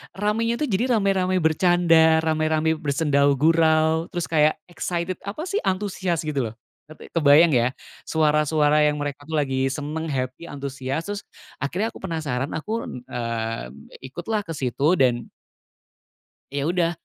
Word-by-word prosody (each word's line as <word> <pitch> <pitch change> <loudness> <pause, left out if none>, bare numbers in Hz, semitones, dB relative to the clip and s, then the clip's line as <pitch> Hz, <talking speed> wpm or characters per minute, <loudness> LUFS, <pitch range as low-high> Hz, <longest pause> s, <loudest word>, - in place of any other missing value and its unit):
ramenya 215 +4 0
tu 270 - -3
jadi, 240 +5 +1
rame-rame 190 -3 +1
bercanda, 160 -1 +4
rame-rame 155 0 +1
bersendau 140 -2 +2
gurau, 160 +2 +3
terus 175 -1 -4
kayak 155 -1 +4 0.2
excited, 175 +1 -3
apa 215 +11 -4
sih, 405 - 0
antusias 185 -3 -1
gitu 145 -5 -1
loh, 110 - -14 0.3
ngerti, 155 0 -13
kebayang 155 +1 +5
ya, 125 -1 +2 0.3
suara-suara 150 -1 +3
yang 150 0 +2
mereka 145 0 -5
tuh 160 - -3
lagi 135 -2 0
seneng, 150 +3 -4
happy, 130 +1 -3
antusias. 140 0 -4
Terus, 205 0 -3 0.4
akhirnya 180 - -1
aku - - -12
penasaran, 155 -7 -3
aku, 220 +8 -3
n 125 - -7
eee, 115 - -3 0.4
ikutlah 190 +9 -3
ke 165 - -5
situ. 140 +5 +1
Dan 120 -4 +2 1.2
ya 140 +1 -2
udah, 170 -1 +1
155 Hz, 140 wpm, -23 LUFS, 140-175 Hz, 1.2 s, kebayang